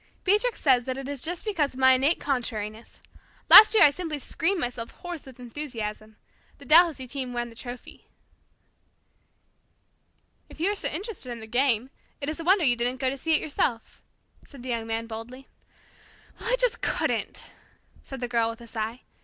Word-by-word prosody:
Beatrix 420 +5 +1
says 255 -4 +3
that 260 0 -3
it 270 0 -6
is 280 -2 -5
just 345 - -4
because 315 -11 -1
of - - -9
my 260 0 +6
innate 275 +6 +2
contrariness. 225 -5 -4 0.5
Last 430 +1 +11
year 425 - +7
I 290 - +7
simply 320 -1 -5
screamed 345 +7 -1
myself 245 -4 -3
hoarse 350 -5 -9
with 260 -1 -14
enthusiasm. 225 -5 -6 0.4
The 280 - -13
Dalhousie 315 -2 +5
team 255 -1 -5
won 240 0 -3
the 230 - -15
trophy." 245 +1 -10 2.4
"If - - -14
you 365 +5 +1
are - - -3
so - - -1
interested 375 - -5
in 235 - -6
the 220 - -9
game, 245 +1 0 0.3
it 285 - -4
is 310 - -5
a - - -5
wonder 370 0 +3
you 245 -3 +4
didn't 245 +2 -1
go 260 -1 0
to - - -4
see 320 +4 +1
it - - +2
yourself," 260 -6 -2 0.4
said 275 -4 -14
the 255 - -7
Young 230 -2 -3
Man 225 0 -2
boldly. 230 +4 -9 0.9
"Well, 470 - -3
I - - +4
just - - +1
couldn't," - - -2 0.5
said 270 -2 -9
the 245 - -2
Girl 230 -1 +1
with 230 +1 -9
a - - -11
sigh. 225 +1 -5
260 Hz, 185 wpm, -26 LUFS, 235-315 Hz, 2.4 s, Last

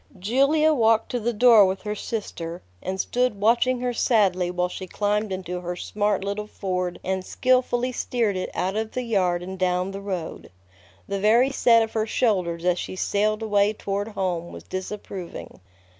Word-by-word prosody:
Julia 275 - +3
walked 225 -4 +2
to 245 - -1
the 235 +2 0
door 230 -1 +7
with 190 +1 -3
her 210 0 -2
sister, 175 -6 -5 0.2
and 190 0 -4
stood 245 0 0
watching 240 +4 +2
her 250 -1 -1
sadly 190 -7 +2
while 180 0 0
she 185 +1 -7
climbed 210 +1 -1
into 180 -1 -4
her 175 0 -4
smart 205 +2 -1
little 200 +1 -3
Ford 180 -3 -3
and 190 0 -2
skillfully 255 +2 +1
steered 235 -4 -1
it 185 - -3
out 190 +2 -1
of 220 0 -3
the 255 - -2
yard 185 -6 +1
and 190 +1 -7
down 180 +1 0
the 195 0 -6
road. 185 -5 -5 0.6
The 200 0 -2
very 235 +6 +4
set 230 -4 +4
of 220 - -6
her 220 0 0
shoulders 180 -8 0
as 180 0 +2
she - - -5
sailed 210 +3 0
away 205 -1 +2
toward 200 0 -3
home 185 -5 -3
was - - -10
disapproving. 185 -1 -7
205 Hz, 175 wpm, -24 LUFS, 185-225 Hz, 0.6 s, door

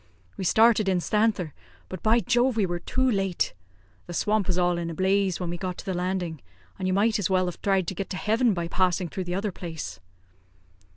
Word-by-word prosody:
We 190 - -4
started 220 +1 +4
instanther, 190 -1 +1 0.4
but, 185 -3 -7
by 230 +2 +4
Jove! 245 +3 +2
we 210 - +3
were 175 -1 -2
too 260 +8 0
late. 195 -6 0 0.5
The 175 - -6
swamp 210 0 +1
was 180 -2 +1
all 175 -1 +2
in 170 -1 -3
a 165 - -5
blaze 190 0 +1
when 175 -2 -3
we 175 - -3
got 180 -1 -4
to - - -9
the 190 - -2
landing, 180 -3 -2 0.4
and 185 - -1
you 185 - +1
might 215 +2 +2
as 195 - 0
well 185 -1 +2
have 180 - -4
thried 195 -2 +2
to 190 - -3
get 195 +1 -5
to 185 - -4
heaven 225 +1 +2
by 170 -1 -2
passing 180 0 +1
through 185 +2 -4
the 175 0 -3
other 200 +1 -1
place." 160 - -7
185 Hz, 220 wpm, -26 LUFS, 175-210 Hz, 0.5 s, started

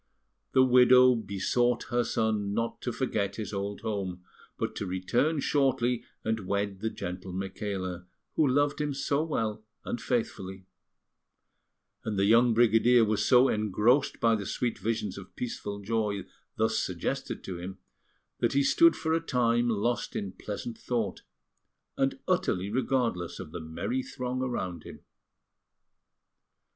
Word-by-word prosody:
The 130 - +6
widow 125 0 +7
besought 120 +3 0
her 120 0 +2
son 110 -3 0
not 115 +1 -2
to 125 - -2
forget 105 -6 -1
his 105 -2 -5
old 100 0 -3
home, 95 -4 -3 0.3
but - - -3
to 100 - -3
return 120 - 0
shortly 125 -4 +1 0.2
and 110 -4 -2
wed 100 -1 -1
the 110 - -1
gentle 90 -2 -6
Micaela, 95 -1 -4 0.3
who 155 - +4
loved 145 +3 +2
him 145 -2 -1
so 140 +1 0
well 110 -9 -2 0.2
and 120 - -3
faithfully; 95 -6 -3 1.4
and 105 -2 -3
the 100 - +3
young 115 +2 +5
brigadier 115 +1 +5
was 105 -1 +1
so 125 0 +6
engrossed 110 +6 +2
by 115 -1 +4
the 100 -4 -2
sweet 120 -2 -2
visions 105 -4 -2
of 95 - -13
peaceful 105 -4 -4
joy 105 -2 -1 0.3
thus 110 0 +1
suggested 115 +10 -3
to 90 -2 -6
him, 95 +2 -7 0.6
that - - +1
he 140 +1 +3
stood 335 - +5
for 160 0 -1
a 165 - +2
time 120 -5 +2
lost 110 0 -1
in 100 -2 -3
pleasant 105 +4 -6
thought, 115 -5 -2 0.7
and - - 0
utterly 95 +3 0
regardless 120 -8 -1
of 85 -5 -8
the 85 - -6
merry 80 - -3
throng 130 - -4
around 95 -9 -3
him. - - -11
110 Hz, 145 wpm, -29 LUFS, 100-125 Hz, 1.4 s, widow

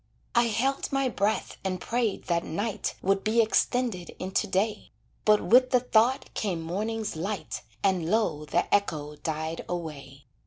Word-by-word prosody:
I 235 0 +4
held 255 +5 0
my 275 -1 +1
breath 210 -1 -1
and 185 -1 -2
prayed 235 -1 -1
that 170 -1 0
night 205 +5 -2
Would 195 +1 +2
be 225 +2 +2
extended 225 -3 +1
into 190 +3 -1
day, 205 +3 -1 0.4
But 210 -1 +5
with 255 +2 +5
the 250 -1 +4
thought 245 +1 +2
came 190 -6 -1
morning's 215 +5 -2
light, 195 +6 -4 0.2
And 185 -4 +1
low 175 -8 +1
the - - +1
echo 155 -7 0
died 160 +1 -3
away. 145 -5 -6
200 Hz, 150 wpm, -27 LUFS, 170-225 Hz, 0.4 s, But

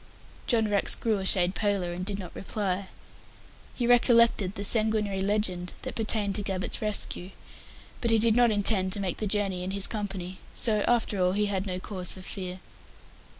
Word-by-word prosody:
John 225 -3 +2
Rex 205 -1 +2
grew 220 -3 0
a 190 - -1
shade 180 -1 +3
paler, 200 -5 -1
and 180 +1 -5
did 195 +1 -3
not 185 -3 -8
reply. 195 -1 -3 0.9
He 245 - -1
recollected 235 -5 +4
the 200 - -4
sanguinary 215 -2 +3
legend 190 -3 -1
that - - -4
pertained 215 -2 0
to - - -2
Gabbett's 190 -2 -3
rescue. 205 -4 -2 0.7
But 235 - +1
he 225 - +4
did 220 0 +4
not 240 -1 +5
intend 200 -3 +1
to 205 - -2
make 190 -3 -2
the 215 - -2
journey 195 -3 0
in 185 - -3
his 195 0 0
company, 195 -4 -5 0.2
so, 215 -3 +2
after 225 -5 +1
all, 180 0 +2
he 210 +1 +1
had 200 -1 -2
no 180 -1 -3
cause 185 -2 -5
for 185 - -10
fear. 185 -1 -6
200 Hz, 185 wpm, -28 LUFS, 185-215 Hz, 0.9 s, not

